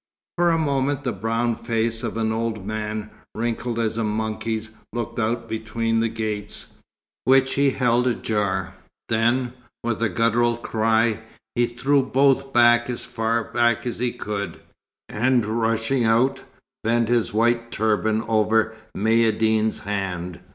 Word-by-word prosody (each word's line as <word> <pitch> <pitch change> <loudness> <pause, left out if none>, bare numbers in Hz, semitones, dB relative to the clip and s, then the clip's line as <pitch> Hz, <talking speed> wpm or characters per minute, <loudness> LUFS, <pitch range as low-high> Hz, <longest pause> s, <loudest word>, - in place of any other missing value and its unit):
For 175 0 +3
a 165 - +3
moment 140 -2 0
the 125 - -1
brown 115 +4 0
face 115 -1 -1
of - - -4
an 110 -1 0
old 110 -3 -2
man, 105 0 -4 0.2
wrinkled 115 +1 -2
as 115 -1 -1
a - - +1
monkey's, 110 +1 -2 0.2
looked 120 +1 -4
out 115 +1 -1
between 115 +1 -1
the 115 0 +1
gates, 110 -2 -5 0.5
which 135 0 +4
he 140 0 +3
held 125 -1 +2
ajar; 100 -6 -1 0.4
then, 120 +2 +1 0.3
with 115 -1 -2
a 115 - +2
guttural 115 +1 +2
cry, 110 -1 +1 0.3
he 120 0 +2
threw 135 +4 +2
both 135 0 +2
as 120 0 +4
far 115 -1 -1
back 120 0 +1
as 120 - -3
he 125 0 0
could, 100 -2 -5 0.5
and 125 +1 +1
rushing 115 +3 0
out, 120 +5 +2 0.4
bent 115 +1 +2
his 120 -1 +1
white 115 +2 +1
turban 110 0 +1
over 110 0 +2 0.2
Maïeddine's 110 0 +2
hand. 90 -4 -3
115 Hz, 135 wpm, -23 LUFS, 110-120 Hz, 0.5 s, which